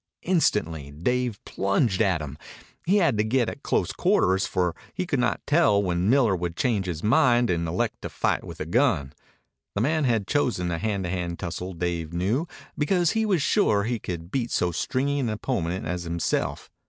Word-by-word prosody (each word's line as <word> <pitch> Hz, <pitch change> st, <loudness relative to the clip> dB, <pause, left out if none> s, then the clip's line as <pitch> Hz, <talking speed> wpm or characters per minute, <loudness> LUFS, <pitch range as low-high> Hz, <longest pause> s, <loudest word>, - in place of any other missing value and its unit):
Instantly 105 Hz, -, +1 dB
Dave 120 Hz, +9 st, -1 dB
plunged 100 Hz, +1 st, +1 dB
at 90 Hz, -6 st, +2 dB
him. 70 Hz, -1 st, -7 dB, 0.5 s
He 195 Hz, +4 st, +4 dB
had 155 Hz, -, +2 dB
to -, -, +4 dB
get 115 Hz, +1 st, +1 dB
at -, -, -8 dB
close -, -, 0 dB
quarters, 95 Hz, +1 st, +2 dB
for 90 Hz, -2 st, 0 dB, 0.2 s
he 185 Hz, -, -1 dB
could 145 Hz, -6 st, -1 dB
not 125 Hz, -, 0 dB
tell 145 Hz, -11 st, +3 dB
when 90 Hz, +1 st, 0 dB
Miller 120 Hz, -6 st, +4 dB
would 85 Hz, -1 st, -3 dB
change 105 Hz, -5 st, 0 dB
his 85 Hz, -3 st, -4 dB
mind 120 Hz, +1 st, +4 dB
and 85 Hz, -1 st, -1 dB
elect 80 Hz, -, -2 dB
to -, -, -5 dB
fight -, -, 0 dB
with -, -, -9 dB
a -, -, -3 dB
gun. 70 Hz, 0 st, +1 dB, 0.6 s
The 100 Hz, -, 0 dB
man 155 Hz, +4 st, +1 dB
had 115 Hz, -5 st, +1 dB
chosen 110 Hz, -10 st, 0 dB
a 85 Hz, -, -2 dB
hand 100 Hz, -1 st, -1 dB
to 90 Hz, -, -3 dB
hand 85 Hz, -2 st, -3 dB
tussle, 90 Hz, +1 st, -5 dB
Dave 85 Hz, -2 st, -3 dB
knew, 105 Hz, -, 0 dB, 0.3 s
because 175 Hz, +2 st, +2 dB
he 220 Hz, -1 st, 0 dB
was 185 Hz, -8 st, +2 dB
sure 105 Hz, -, +3 dB
he 115 Hz, +1 st, -1 dB
could 85 Hz, -2 st, -6 dB
beat 120 Hz, -3 st, -1 dB
so 90 Hz, -, +1 dB
stringy 140 Hz, -, -1 dB
an 125 Hz, -4 st, 0 dB
opponent 100 Hz, -5 st, -2 dB
as 90 Hz, +2 st, -2 dB
himself. 85 Hz, 0 st, -2 dB
100 Hz, 190 wpm, -25 LUFS, 85-130 Hz, 0.6 s, He